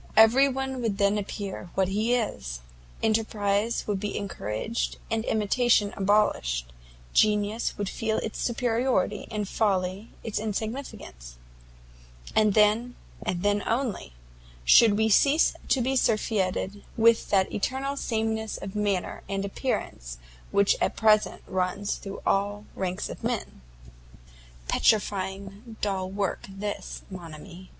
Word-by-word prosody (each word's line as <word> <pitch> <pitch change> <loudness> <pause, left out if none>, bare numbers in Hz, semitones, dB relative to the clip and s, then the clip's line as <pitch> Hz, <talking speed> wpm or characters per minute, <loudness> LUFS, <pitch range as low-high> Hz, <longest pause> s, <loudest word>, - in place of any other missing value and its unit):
Every 235 +5 +7
one 265 -1 -3
would 220 -4 -1
then 200 0 +2
appear 195 -3 -5
what 190 -1 +2
he 220 +5 +1
is; 65 - -3 0.4
enterprize 215 0 +1
would 205 -2 -1
be 210 +1 -3
encouraged, 195 - -3
and 225 0 0
imitation 215 0 +2
abolished; - - +1 0.4
genius 210 +1 +2
would 205 - -2
feel 220 +2 -1
its 220 - -4
superiority, 235 -4 0
and 210 -2 -3
folly 195 0 0
its 220 - -2
insignificance; 215 - -5 1.0
and 215 -2 +4
then, 220 +3 +3 0.3
and 175 0 -2
then 205 0 +2
only, 230 - -2 0.5
should 210 - +7
we 220 0 +3
cease 280 +8 +4
to 265 - +2
be 265 +3 0
surfeited 205 -4 0
with 230 0 +4
that 190 -2 +2
eternal 265 +6 -1
sameness 220 -4 -2
of 195 +1 -7
manner 205 -3 -1
and 195 0 -1
appearance - - -3 0.3
which 200 0 +3
at - - +1
present 215 -1 +3
runs 185 +2 -1
through 195 -1 -8
all 205 +1 0
ranks 185 -1 -3
of - - -9
men." - - -3 1.1
"Petrifying 200 +1 0
dull 190 -2 -1
work 195 0 -2
this, 200 +1 -5
_mon 170 -4 -8
ami! 185 +3 -12
205 Hz, 125 wpm, -27 LUFS, 195-225 Hz, 1.1 s, Every